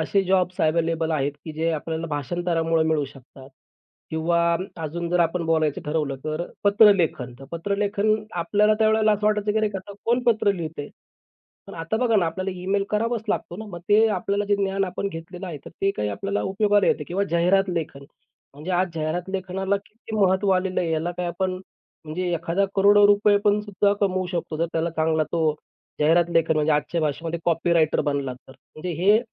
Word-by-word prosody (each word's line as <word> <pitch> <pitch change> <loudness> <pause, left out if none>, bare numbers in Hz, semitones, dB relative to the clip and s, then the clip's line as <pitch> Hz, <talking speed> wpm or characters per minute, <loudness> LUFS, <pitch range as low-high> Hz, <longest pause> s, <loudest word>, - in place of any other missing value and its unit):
असे 195 +5 +1
jobs 185 -1 +1
available 165 0 +1
आहेत, 145 -2 0
की 160 - -6
जे 160 +2 -1
आपल्याला 160 +1 -3
भाषांतरामुळे 165 +2 0
मिळू 155 -2 +1
शकतात. 135 0 -14 0.6
किंवा 170 +1 +1 0.3
अजून 170 +2 -4
जर 180 0 +2
आपण 170 +1 +1
बोलायचं 160 -3 +1
ठरवलं 150 -2 -1
तर 155 +2 -2 0.2
पत्रलेखन. 200 - +4
तर 135 - -11
पत्रलेखन 200 +4 0 0.3
आपल्याला 210 +5 +3
त्यावेळेला 220 0 +3
असं 210 0 0
वाटायचं, 210 0 +1
की 220 - +1
अरे, 215 -1 +1
आता 190 +1 -9
कोण 240 +2 +1
पत्र 220 -3 +3
लिहितंय? 160 -5 -6 0.8
पण - - -10
आता 165 +6 -3
बघा 230 -1 +2
ना, 180 -5 +3
आपल्याला 185 +4 -3
ईमेल 195 +2 0
करावाच 230 +1 0
लागतो 175 - -2
ना. 220 - -7
मग 175 - -7
ते 215 +2 +5
आपल्याला 200 0 -1
जे 205 0 +1
ज्ञान 195 0 0
आपण 190 +1 -4
घेतलेलं 175 +2 -8
आहे, 170 -4 -5
तर - - -9
ते 195 - +3
काय 105 - -1
आपल्याला 195 - -2
उपयोगाला 205 +1 +2
येतं 150 - +1
किंवा 195 +3 0
जाहिरात 180 +3 +3
लेखन. 160 -5 -4 0.5
म्हणजे 150 +6 -7
आज 180 +1 +2
जाहिरात 165 +3 -2
लेखनाला 190 +1 -1
किती 220 0 -8
महत्त्व 195 0 +2
आलेलं 185 0 0
आहे. 170 - -1
याला 160 +2 -1
काय 180 - -2
आपण 185 +2 -2 0.5
म्हणजे 175 +3 -3
एखादा 170 +4 0
करोडो 205 +1 +6
रुपये 205 0 +4
पण 205 0 +3
सुद्धा 205 -1 +1
कमवू 185 -2 +1
शकतो. 170 -3 -4
जर 165 +2 0
त्याला 165 +1 0
चांगला 160 -1 +1
तो 160 -2 +2 0.5
जाहिरात 165 +3 +3
लेखन 165 -1 +3
म्हणजे 155 0 +2
आजच्या 150 +3 0
भाषेमध्ये 160 +2 -2
कॉपीराइटर 165 -1 +2
बनला 140 -2 -1
तर. 125 +1 -17 0.2
म्हणजे 175 +3 -4
हे 205 +3 +6
175 Hz, 180 wpm, -24 LUFS, 160-200 Hz, 0.8 s, करोडो